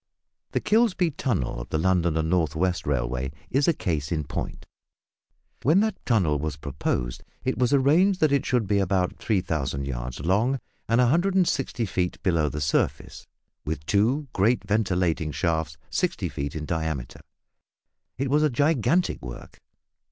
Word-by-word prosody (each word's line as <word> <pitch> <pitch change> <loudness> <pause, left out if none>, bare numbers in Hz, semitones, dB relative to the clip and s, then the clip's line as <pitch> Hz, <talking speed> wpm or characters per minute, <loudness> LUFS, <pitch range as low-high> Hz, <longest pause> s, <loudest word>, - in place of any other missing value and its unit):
The - - +2
Kilsby 210 -5 +2
tunnel 115 - -2
of - - -9
the - - 0
London 85 -1 +2
and 80 0 0
North 80 -3 +1
west 90 -1 0
Railway 65 -1 -1 0.2
is 135 +2 +2
a 170 - +5
case 80 - -2
in 80 -2 0
point. - - -5 1.0
When 160 +8 +4
that 215 -3 -2
tunnel 90 - +2
was 75 -1 -3
proposed, 65 -4 -3 0.2
it 130 -1 -1
was 125 -1 +2
arranged 160 +8 +4
that 155 -2 +3
it 140 -2 +2
should 125 -4 +1
be 100 +1 +2
about 95 -1 0
3000 75 - -1
yards 60 -2 -5
long, 105 - +1 0.3
and 115 +1 +3
160 160 -3 +2
feet 90 -3 -2
below 80 -5 +2
the 75 +2 -5
surface, 75 - -1 0.4
with 75 -1 -4
two 120 - +2
great 110 +3 +2
ventilating 90 -7 0
shafts 80 -1 -1
60 - - -1
feet 70 +2 -4
in 75 -1 -4
diameter. 80 -6 -3 1.0
It 135 +1 -1
was 150 +1 +4
a 155 - +4
gigantic 145 +6 +1
work. - - -9
95 Hz, 150 wpm, -25 LUFS, -, 1.0 s, a